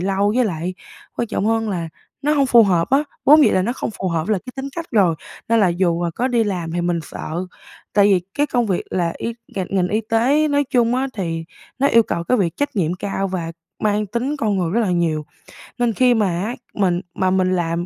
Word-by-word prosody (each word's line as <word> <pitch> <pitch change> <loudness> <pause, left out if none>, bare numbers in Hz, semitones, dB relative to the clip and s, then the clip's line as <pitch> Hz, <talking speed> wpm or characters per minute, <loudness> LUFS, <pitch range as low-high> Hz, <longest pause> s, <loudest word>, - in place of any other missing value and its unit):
lâu. 195 +2 +1
Với 255 - +4
lại 180 -2 -3 0.4
quan 235 - -2
trọng 215 - -1
hơn 225 -1 +1
là 170 -4 -3 0.3
nó 295 +2 +2
hông 280 -2 +3
phù 235 -2 +7
hợp 180 +1 +1
á, 275 - +5 0.3
vốn 300 +1 +7
dĩ - - +4
là 185 - +2
nó 235 - -1
không 250 - -4
phù 185 - -1
hợp 165 +2 -2
là 210 -3 +2
cái 250 +8 -11
tính 270 +1 -4
cách 335 - -3
rồi, 185 -7 +4 0.3
nên 230 0 +3
là 195 - +4
dù 175 -1 0
là 170 - -1
có 245 +10 -1
đi 235 -3 +2
làm 175 -5 -3
thì 175 - -1
mình 175 0 0
sợ 170 +4 -5 0.5
tại 205 - +4
vì 190 -3 +4
cái 290 +1 +1
công 245 -4 0
việc 190 -4 0
là 170 -2 0
y 230 - -3 0.2
ngành 190 -2 -2
ngành 185 -2 +1
y 215 +2 0
tế 270 +7 +3
nói 285 0 +2
chung 240 -1 +3
á 265 +1 0
thì 165 -5 -3 0.3
nó 275 - +3
yêu 230 -4 +5
cầu 170 -5 -3
cái 250 - +2
việc 170 -4 0
trách 285 -4 -2
nhiệm 175 -2 +1
cao 195 +1 -3
và 170 -3 -4 0.3
mang 210 0 +1
tính 250 +8 -2
con 215 -7 0
người 170 -2 0
rất 230 - +1
là 210 -5 +1
nhiều. 165 -3 0 0.5
Nên 240 -2 +1
khi 250 +2 +4
mà 215 -4 +2
á, 185 +7 -2 0.2
mình 185 -3 +1
mà 185 - +1
mình 185 -1 +2
làm 170 0 -1
200 Hz, 245 wpm, -20 LUFS, 175-235 Hz, 0.5 s, phù